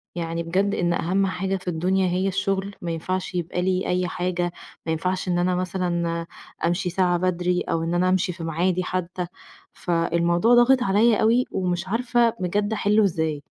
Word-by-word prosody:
يعني 165 0 -3
بجد 190 +4 0
إن 175 -1 +1
أهم 190 +4 +1
حاجة 190 +1 -2
في 185 - -15
الدنيا 185 +3 +1
هي 185 +2 0
الشغل، 195 +1 -1
ما 170 - -3
ينفعش 185 +3 -3
يبقى 175 +1 -2
لي 185 0 0
أي 180 0 0
حاجة، 175 -1 -2 0.3
ما 160 - -1
ينفعش 185 +4 -1
إن 175 -1 +1
أنا 180 0 +1
مثلًا 175 -2 -1 0.4
أمشي 175 +2 0
ساعة 180 0 +1
بدري، 180 0 0
أو 165 0 -1
إن 165 - -2
أنا 180 +1 +2
أمشي 185 0 +1
في 170 - -8
ميعادي 175 +3 0
حتى، 180 0 -3 0.5
فالموضوع 170 +5 +2
ضاغط 245 +1 +5
عليَّ 210 +3 +3
أوي، 235 +3 +3
ومش 180 -1 -2
عارفة 235 +2 +2
بجد 205 +4 0
أحلُّه 210 0 +3
إزاي؟ 160 -6 0
180 Hz, 175 wpm, -24 LUFS, 175-195 Hz, 0.5 s, ضاغط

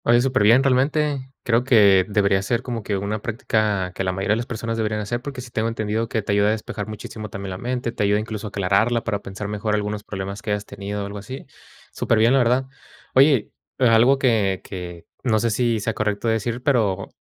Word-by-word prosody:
Oye, 120 0 +5
superbién 125 -1 +4
realmente. 135 +1 +1
Creo 120 +1 +2
que 100 -7 +5
debería 100 -2 +2
ser 115 +5 -1
como 120 -3 -4
que 100 -1 -2
una 100 +2 -3
práctica 110 -5 -1
que 95 - -3
la 95 - 0
mayoría 95 +3 0
de - - +1
las 120 - -4
personas 115 0 -4
deberían 110 -1 -1
hacer, 120 +3 -3
porque 135 -1 -6
sí 120 -1 -11
tengo 110 0 -1
entendido 110 0 -2
que 110 -4 -1
te 105 - -2
ayuda 100 0 +3
a - - +3
despejar 110 -1 -4
muchísimo 110 0 -7
también 100 -1 -6
la 90 - -5
mente, 125 -1 -2
te - - -5
ayuda 105 0 +3
incluso 110 0 -5
a - - -5
aclararla 100 +5 +1
para 105 -3 -2
pensar 100 +1 -6
mejor 105 +1 -1
algunos 105 0 -3
problemas 100 0 -6
que 105 - -3
hayas 105 0 -3
tenido 100 0 -5
o - - -4
algo 100 +1 -6
así. 130 +7 -8 0.5
Superbién, 115 +1 +2
la 135 - +5
verdad. 125 +2 +2 0.5
Oye, 135 -4 +4 0.3
a 125 -3 +4
algo 125 +5 +5
que 110 -8 +1
que 90 -3 -8 0.2
no 115 -4 +2
sé 115 +1 0
si 115 0 +1
sea 110 +2 -2
correcto 105 +1 -2
decir, 115 +2 -1
pero 110 -9 +1
110 Hz, 220 wpm, -22 LUFS, 100-120 Hz, 0.5 s, Oye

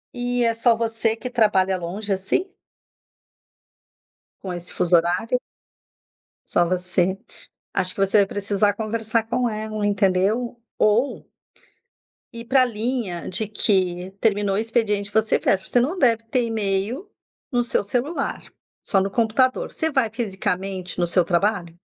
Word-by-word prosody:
E 245 0 0
é 230 - +2
só 230 +1 +3
você 225 0 0
que 250 - -6
trabalha 205 -6 +2
longe, 190 +4 -3
assim? 200 - -1 1.9
Com 185 -2 -5
esse 175 0 -6
fuso 175 0 +2
horário? 180 +9 +1 1.1
Só 175 - +2
você. 180 +1 0 0.6
Acho 185 -1 0
que - - -6
você 195 +2 +3
vai 200 - +5
precisar 205 +1 0
conversar 225 +1 -1
com 245 +2 0
ela, 215 -1 -3
entendeu? 205 +4 +1 0.2
Ou 225 +6 +1 1.1
ir 230 0 -7
pra 265 -1 +5
linha 225 -6 -3
de 210 +4 -3
que 185 -3 0
terminou 205 -2 +1
o - - 0
expediente 215 -2 0
você 220 0 +2
fecha. 190 -1 +1
Você 245 - +3
não 290 +10 0
deve 230 -4 +3
ter 245 +2 +1
e-mail 220 - -1 0.4
no 245 -2 +2
seu 235 - 0
celular, 250 +10 -2 0.4
só 195 - +2
no 195 +1 -1
computador. 240 +4 +1
Você 320 0 +1
vai 265 -6 +2
fisicamente 190 -4 -3
no 175 - +3
seu 175 +1 +2
trabalho? 175 -1 0
215 Hz, 140 wpm, -23 LUFS, 190-235 Hz, 1.9 s, vai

